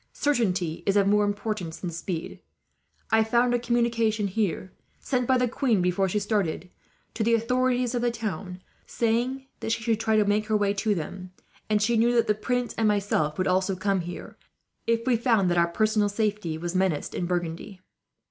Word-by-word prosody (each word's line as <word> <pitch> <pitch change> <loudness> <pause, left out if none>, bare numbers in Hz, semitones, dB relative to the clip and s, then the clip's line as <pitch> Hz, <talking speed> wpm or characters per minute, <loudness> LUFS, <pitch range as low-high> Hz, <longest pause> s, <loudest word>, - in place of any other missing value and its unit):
Certainty 190 - 0
is 200 +1 +3
of 200 - +4
more 210 +1 +3
importance 205 -5 -3
than 180 - -5
speed. 170 0 -5 0.7
I 220 0 +5
found 240 +2 +2
a 245 - +2
communication 235 -3 +1
here, 190 -2 -2 0.3
sent 250 -3 -1
by 260 - +4
the 250 0 +2
queen 240 -3 +1
before 180 +2 +1
she 210 - -1
started 200 -4 -1 0.4
to 225 - -1
the 230 +1 +3
authorities 250 +1 +1
of 245 - 0
the 240 - +2
town, 195 -5 -5 0.2
saying 245 +4 -1
that 225 - -3
she 225 - -1
should 225 -1 +1
try 220 -1 +1
to 210 - +4
make 210 +1 +1
her 215 -1 +2
way 200 -1 +1
to 205 +1 0
them; 185 +2 -6 0.4
and 210 -1 +2
she 235 +2 +2
knew 240 +2 +3
that 230 -1 +4
the 210 - +2
prince 245 +3 -2
and 220 - +3
myself 200 -7 0
would 185 - 0
also 185 +1 +1
come 190 0 0
here, 175 +1 -8 0.5
if 230 0 +1
we 255 -2 +3
found 225 -6 +2
our 170 -1 +3
personal 215 +3 +1
safety 205 -6 -1
menaced 175 -1 -1
in 175 - -2
Burgundy. 175 +2 -3
210 Hz, 185 wpm, -26 LUFS, 185-230 Hz, 0.7 s, I